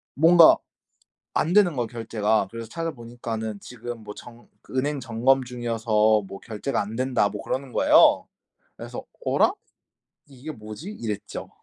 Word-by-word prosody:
뭔가 165 +3 +7 0.8
안 165 +4 +1
되는 190 -7 +5
거야 120 -2 -1
결제가. 110 -3 0
그래서 115 -1 -7
찾아보니까는 115 -8 -5
지금 120 -2 -8
뭐 105 0 -8
정 120 0 -13 0.2
그 - - -11
은행 145 +1 -1
점검 130 +2 +2
중이어서 110 -3 +1
뭐 100 - -9
결제가 115 +4 -3
안 105 +2 -5
된다 125 -5 +1
뭐 105 0 -6
그러는 130 -1 -3
거예요. - - +5 0.5
그래서 - - -8 0.2
'어라? - - +3 0.8
이게 140 +3 -9
뭐지?' 110 - -9
이랬죠. 105 - -6
120 Hz, 300 characters per minute, -25 LUFS, 110-135 Hz, 0.8 s, 뭔가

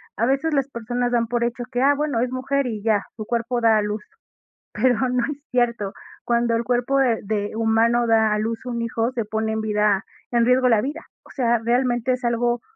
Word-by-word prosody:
A 230 - +1
veces 275 +5 +1
las 275 -1 +1
personas 245 0 -2
dan 235 -1 +1
por 240 0 -1
hecho 240 +1 -2
que, 245 -1 -1
ah, 280 +2 +5
bueno, 290 -4 -1
es 250 0 -1
mujer 265 +1 -1
y 220 -3 -4
ya, 215 -3 +2
su 215 - -6
cuerpo 235 +2 -1
da 225 -1 +5
a - - +2
luz. 210 0 -3 0.7
Pero 255 -3 +2
no 250 -1 +1
es 285 - -7
cierto, 235 -5 0 0.3
cuando 235 -1 +1
el 230 - 0
cuerpo, 245 +3 +1
eh, 240 -4 +2
de 205 0 -2
humano 230 +1 +2
da 220 -1 +3
a 210 - 0
luz 225 +3 -3
un 240 -2 -3
hijo, 230 +1 -1
se 235 -4 -2
pone 220 +1 -2
en 220 - -1
vida 210 -2 +1 0.3
en 235 -1 +3
riesgo 250 +1 +4
la 225 -3 +4
vida, 290 +6 -4 0.2
O - - -19
sea, 240 -3 +1
realmente 240 +1 +1
es 250 0 -4
algo 240 0 0
235 Hz, 220 wpm, -22 LUFS, 220-250 Hz, 0.7 s, ah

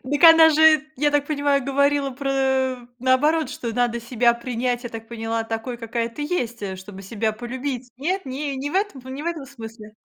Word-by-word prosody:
Дак 290 +4 +1
она 325 -1 +9
же, 310 -1 +6
я 295 +2 +2
так 290 -1 +1
понимаю, 285 -3 +1
говорила 280 0 +2
про, 275 +1 -3
э, 265 -1 +1 0.2
наоборот, 290 +5 +2
что 235 -2 -5
надо 240 -1 0
себя 235 0 +2
принять, 245 0 -2
я 240 - -5
так 225 0 -8
поняла, 225 -1 -3
такой, 225 +2 -4
какая 230 0 -3
ты 235 +6 -7
есть, 245 -8 -2
э, 190 -1 -4
чтобы 190 +1 -10
себя 220 +2 -2
полюбить. 250 +2 -5
Нет, 365 +7 -2
ни 275 +2 -4
не 270 +2 -4
в - - -8
этом 390 -8 0
п 260 - -10
не 270 +3 -6
в - - -6
этом 320 -5 -3
смысле? 225 -5 -10
260 Hz, 210 wpm, -23 LUFS, 235-290 Hz, 0.2 s, она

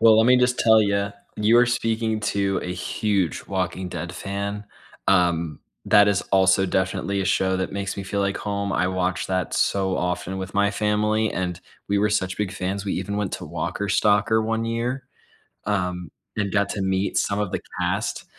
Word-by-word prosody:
Well, 110 -1 +7
let 110 - +5
me 125 - +6
just 125 0 +2
tell 110 -1 +6
you, 100 -1 +1 0.3
you 110 +3 +4
are 125 - +5
speaking 115 -2 0
to 100 -2 0
a 90 - -3
huge 90 -1 -1
Walking 95 -1 -2
Dead 90 0 -5
fan. 100 +2 -4 0.4
Um, 85 -5 +2 0.2
that 105 -1 +6
is 100 -2 +2
also 95 0 +4
definitely 95 +2 -1
a - - -1
show 95 0 +1
that 95 - -3
makes 100 0 -3
me 100 - -4
feel 100 +1 -2
like 100 0 0
home. 100 -1 -2
I 90 0 +1
watched 95 0 -1
that 95 -2 -1
so 95 -1 +1
often 90 +1 -2
with 95 0 -5
my 100 0 +3
family, 105 +1 +1
and 90 -1 -3 0.3
we 100 0 +2
were 105 +1 +2
such 95 -2 0
big 105 -3 -2
fans, 100 +2 -3
we 100 - -2
even 100 +2 -3
went 105 -2 -2
to - - -6
Walker 85 +5 -3
Stalker 105 +2 +3
one 110 +1 -1
year. 120 +3 -2 0.6
Um, 90 -4 -2 0.3
and 100 -2 -1
got 100 -1 +2
to 100 - -3
meet 95 +1 0
some 100 0 0
of 105 -3 -1
the - - -2 0.2
cast. - - -1
100 Hz, 195 wpm, -24 LUFS, 95-105 Hz, 0.6 s, Well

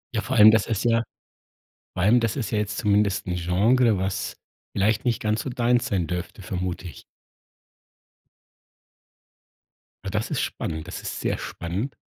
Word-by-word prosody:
Ja, 110 - +1
vor 130 +4 -3
allem, 110 -1 +9
das 110 -1 +2
ist 115 0 -1
ja 115 -1 +3 0.9
vor 95 - -2
allem, 110 +6 +5
das 115 -2 0
ist 130 -6 -3
ja 110 - 0
jetzt 105 +1 -2
zumindest 105 -2 +1
'n 90 - -1
Genre, 105 +6 +3
was 95 0 -2 0.4
vielleicht 105 +2 +1
nicht 120 -3 0
ganz 110 0 0
so - - -5
deins 120 -1 +1
sein 90 -4 0
dürfte, 90 +2 -5
vermute 90 -1 -4
ich. 80 - -12 3.0
Na, - - -4
das - - -2
ist - - 0
spannend, 80 -1 -4
das - - -6
ist - - -5
sehr - - 0
spannend. 95 +10 -4
105 Hz, 165 wpm, -24 LUFS, 95-115 Hz, 3.0 s, allem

